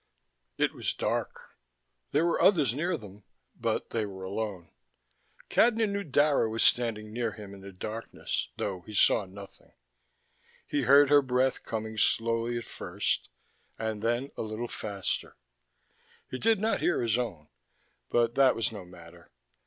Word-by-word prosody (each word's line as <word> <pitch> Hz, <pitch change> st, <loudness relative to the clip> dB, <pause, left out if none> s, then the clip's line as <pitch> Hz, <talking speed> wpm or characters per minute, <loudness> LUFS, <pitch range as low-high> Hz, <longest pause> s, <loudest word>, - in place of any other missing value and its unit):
It -, -, +2 dB
was -, -, -2 dB
dark. -, -, -3 dB, 0.6 s
There 155 Hz, +4 st, +2 dB
were 170 Hz, -, +1 dB
others 155 Hz, -, +4 dB
near 170 Hz, +5 st, -1 dB
them, 105 Hz, -3 st, -13 dB, 0.3 s
but -, -, -2 dB
they 115 Hz, -, 0 dB
were 95 Hz, -2 st, -7 dB
alone. 95 Hz, -2 st, -4 dB, 0.8 s
Cadnan 225 Hz, -2 st, +3 dB
knew 200 Hz, 0 st, -2 dB
Dara 145 Hz, -, +3 dB
was 115 Hz, +1 st, +1 dB
standing 110 Hz, -3 st, +2 dB
near 115 Hz, -2 st, -1 dB
him 105 Hz, -2 st, -10 dB
in 100 Hz, -, -11 dB
the 100 Hz, 0 st, -9 dB
darkness, 110 Hz, +5 st, -4 dB
though 95 Hz, -3 st, -3 dB
he 105 Hz, +4 st, -10 dB
saw 105 Hz, +1 st, +4 dB
nothing. 100 Hz, +1 st, -13 dB, 0.9 s
He 145 Hz, -, -1 dB
heard 140 Hz, +2 st, +6 dB
her 145 Hz, -1 st, +8 dB
breath 130 Hz, 0 st, +1 dB
coming 110 Hz, -1 st, -4 dB
slowly 115 Hz, +2 st, +2 dB
at 120 Hz, -, -5 dB
first, -, -, -2 dB, 0.5 s
and 110 Hz, -2 st, -3 dB
then 120 Hz, +5 st, 0 dB
a -, -, -4 dB
little 110 Hz, +2 st, -4 dB
faster. 100 Hz, -4 st, -4 dB, 1.0 s
He 130 Hz, -, -4 dB
did 225 Hz, -2 st, +3 dB
not 220 Hz, +2 st, 0 dB
hear 175 Hz, -, +2 dB
his 115 Hz, +1 st, +1 dB
own, 85 Hz, -11 st, -4 dB, 0.6 s
but 120 Hz, -1 st, +2 dB
that 135 Hz, -1 st, +5 dB
was 115 Hz, -, 0 dB
no 105 Hz, -4 st, -7 dB
matter. 85 Hz, -1 st, -15 dB
115 Hz, 155 wpm, -29 LUFS, 105-135 Hz, 1.0 s, her